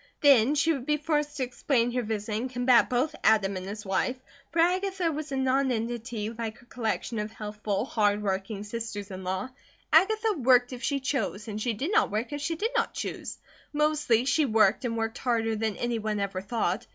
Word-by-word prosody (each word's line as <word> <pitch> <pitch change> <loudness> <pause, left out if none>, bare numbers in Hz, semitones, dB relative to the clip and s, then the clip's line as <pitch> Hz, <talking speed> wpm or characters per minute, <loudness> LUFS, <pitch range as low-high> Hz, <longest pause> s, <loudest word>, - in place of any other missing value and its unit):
Then 275 -1 +6
she 325 +3 +3
would 270 -3 -5
be 300 0 +2
forced 295 -1 -1
to 265 - 0
explain 245 -1 0
her 250 +1 0
visit 215 -1 -3
and 235 +5 -2
combat 245 -1 +4
both 255 +5 +1
Adam 200 -3 +4
and 185 0 -5
his 210 +1 -6
wife; 195 +6 0 0.4
for - - -6
Agatha 365 +1 +2
was 310 0 -5
not 270 - -1
a 265 +1 +2
nonentity 230 -2 -3
like 225 -1 -5
her 245 - -19
collection 230 -1 -3
of 210 +1 -3
healthful, 210 -1 -3
hard 210 -4 +1
working 195 +1 -2
sisters 210 -2 -5
in 185 0 -7
law. 190 +6 -2 0.4
Agatha 430 +6 +4
worked 250 0 +4
if 245 - -7
she 280 0 0
chose, 255 -6 -2
and 215 0 -4
she 235 +1 0
did 275 - -3
not 435 - +3
work 220 +7 -2
if 290 - -4
she 330 +3 -1
did 440 +8 -1
not - - 0
choose. - - -5 0.4
Mostly 295 -6 +2
she 310 +3 +3
worked 220 -1 +3
and 230 -1 -1
worked 225 +2 -2
harder 225 -3 0
than 220 -1 -2
any 240 -1 -1
one 215 -1 -2
ever 195 -2 -2
thought. 210 -1 -1
235 Hz, 205 wpm, -28 LUFS, 215-280 Hz, 0.4 s, Then